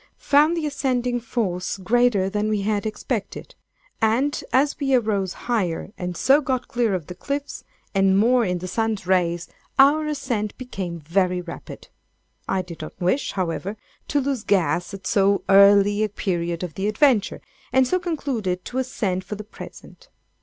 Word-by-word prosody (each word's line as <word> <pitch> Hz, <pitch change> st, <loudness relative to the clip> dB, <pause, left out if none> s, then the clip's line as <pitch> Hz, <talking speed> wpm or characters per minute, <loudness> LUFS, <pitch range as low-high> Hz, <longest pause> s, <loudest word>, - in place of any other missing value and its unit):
Found 300 Hz, +4 st, +3 dB
the 320 Hz, -, -1 dB
ascending 250 Hz, -4 st, -1 dB
force 200 Hz, -7 st, -2 dB
greater 210 Hz, 0 st, +2 dB
than 210 Hz, +2 st, -1 dB
we 210 Hz, -2 st, 0 dB
had 210 Hz, +1 st, -1 dB
expected; 215 Hz, 0 st, -4 dB, 0.5 s
and 245 Hz, +7 st, +1 dB
as 280 Hz, +3 st, +2 dB
we 270 Hz, -2 st, +2 dB
arose 205 Hz, -6 st, 0 dB
higher 195 Hz, -7 st, -1 dB
and 180 Hz, -2 st, -5 dB
so 275 Hz, +3 st, +4 dB
got 260 Hz, -3 st, -2 dB
clear 235 Hz, -6 st, 0 dB
of 175 Hz, -5 st, -4 dB
the 180 Hz, -, -8 dB
cliffs, 280 Hz, +9 st, -5 dB, 0.3 s
and 195 Hz, -1 st, +3 dB
more 240 Hz, +4 st, +4 dB
in 180 Hz, -4 st, 0 dB
the 180 Hz, +1 st, -6 dB
sun's 220 Hz, -1 st, -1 dB
rays, 175 Hz, -2 st, +1 dB, 0.3 s
our 295 Hz, +3 st, +5 dB
ascent 245 Hz, -8 st, -2 dB
became 190 Hz, -9 st, -5 dB
very 180 Hz, +3 st, +1 dB
rapid. 175 Hz, -1 st, -9 dB, 0.6 s
I 190 Hz, -1 st, 0 dB
did 170 Hz, -3 st, -10 dB
not 155 Hz, -, -9 dB
wish, 185 Hz, +11 st, 0 dB
however, 190 Hz, +3 st, -3 dB, 0.3 s
to 290 Hz, -, +1 dB
lose 270 Hz, -4 st, -2 dB
gas 175 Hz, -4 st, +1 dB
at 190 Hz, -1 st, -12 dB
so 200 Hz, 0 st, +2 dB
early 200 Hz, +1 st, +6 dB
a 215 Hz, -, 0 dB
period 175 Hz, -3 st, -2 dB
of 175 Hz, -3 st, -5 dB
the 195 Hz, +2 st, -2 dB
adventure, 215 Hz, -1 st, +2 dB, 0.3 s
and 260 Hz, 0 st, +4 dB
so 365 Hz, -, +1 dB
concluded 260 Hz, -, -2 dB
to 255 Hz, -, -3 dB
ascend 200 Hz, -8 st, -2 dB
for 210 Hz, -, -6 dB
the 210 Hz, -, -7 dB
present. -, -, -12 dB
210 Hz, 165 wpm, -23 LUFS, 185-255 Hz, 0.6 s, early